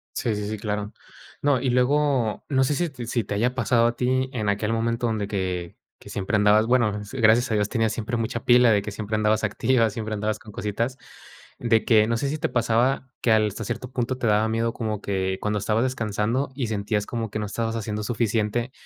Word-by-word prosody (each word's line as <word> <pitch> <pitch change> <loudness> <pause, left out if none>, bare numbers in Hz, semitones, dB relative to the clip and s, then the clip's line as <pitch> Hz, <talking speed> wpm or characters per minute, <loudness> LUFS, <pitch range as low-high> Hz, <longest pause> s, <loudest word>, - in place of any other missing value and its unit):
Sí, 115 - 0
sí, 105 0 -3
sí, 110 - -3
claro. 105 0 -3 0.5
No, 140 -4 +2
y 130 - 0
luego, 125 -2 +1
no 130 -2 +3
sé 140 +3 +1
si 175 +3 0 0.2
si 120 -1 -1
te 100 - -4
haya 120 +5 +1
pasado 120 -2 +2
a 120 - -1
ti 130 +1 0
en 110 -4 -1
aquel 105 +2 0
momento 115 +1 0
donde 110 -3 -1
que 90 -4 -3 0.2
que - - -13
siempre 100 +2 -2
andabas, 105 +2 +4
bueno, 115 -5 +2
s 105 +6 -8
gracias 115 +3 +4
a 110 - +2
Dios 105 -1 +1
tenías 115 -3 +1
siempre 115 +2 -3
mucha 115 +1 -3
pila 125 0 +6
de 100 -2 +2
que 105 - -5
siempre 110 +1 -4
andabas 110 0 +1
activa, 115 +3 +2
siempre 110 0 -5
andabas 110 0 -1
con 105 - -13
cositas, 115 +6 -3 0.6
de 115 -2 +2
que 110 -2 +5
no 115 0 0
sé 140 - -1
si 155 - -2
te - - -1
pasaba 120 +3 +1
que 115 - +2
al 110 -1 +4
hasta 105 +2 -5
cierto 125 +4 -4
punto 125 0 -1
te 120 - -1
daba 105 +1 +3
miedo 115 +1 0
como 110 -3 -3
que 95 -1 -2
cuando 105 0 0
estabas 110 +3 +1
descansando 120 +1 -1
y 130 -5 -2
sentías 105 0 -1
como 115 -3 -4
que 110 - -3
no 105 - -3
estabas 115 +2 -2
haciendo 105 -1 -3
suficiente 115 +1 -1
110 Hz, 225 wpm, -24 LUFS, 105-120 Hz, 0.6 s, pila